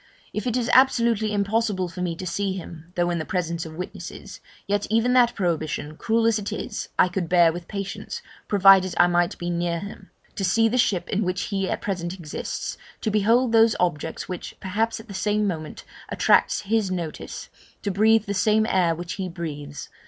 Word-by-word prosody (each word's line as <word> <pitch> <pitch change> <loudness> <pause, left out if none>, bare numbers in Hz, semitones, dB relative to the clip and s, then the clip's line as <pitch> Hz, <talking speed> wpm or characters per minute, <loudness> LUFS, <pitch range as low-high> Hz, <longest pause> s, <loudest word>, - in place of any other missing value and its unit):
If 215 +4 -3
it 245 0 +1
is 240 -2 -1
absolutely 235 -5 +4
impossible 205 -2 0
for 180 +1 -7
me 175 -2 -1
to 185 - -7
see 195 +2 -1
him 170 -2 -9
(though 175 -1 +1
in 170 - -1
the - - -2
presence 170 -1 -2
of 155 - -10
witnesses), 180 +3 -8 0.3
yet 205 0 0
even 230 +3 +2
that 245 -2 +4
prohibition, 155 -4 -2
cruel 225 +6 +1
as 225 -1 +3
it 205 - -5
is, - - -5
I - - +5
could 180 -2 -3
bear 175 -2 +5
with 175 0 -7
patience, 200 -2 -5 0.2
provided 195 -2 +6
I 175 - +7
might 175 0 +1
be 175 0 -3
near 170 0 -1
him, 200 0 -9 0.3
to 195 - -2
see 225 +5 +3
the 250 +3 0
ship 195 -6 +1
in 205 +2 0
which 180 0 -1
he 195 -2 -2
at - - -2
present 185 -3 -3
exists 165 -5 -5 0.2
to 220 - -1
behold 225 +4 +3
those 225 0 +5
objects, 160 -3 -1
which, 180 -2 -6
perhaps, 220 +4 -1
at 220 - -12
the 200 - -9
same 210 +2 0
moment, 160 -5 -4 0.3
attract - - +3
his 215 -1 0
notice 170 -4 -5 0.3
to 200 - -1
breathe 220 +2 +4
the 200 - -2
same 215 +3 +3
air 180 -6 +2
which 175 +1 -5
he 190 -2 -4
breathes. 150 -4 -6
190 Hz, 195 wpm, -24 LUFS, 175-215 Hz, 0.3 s, I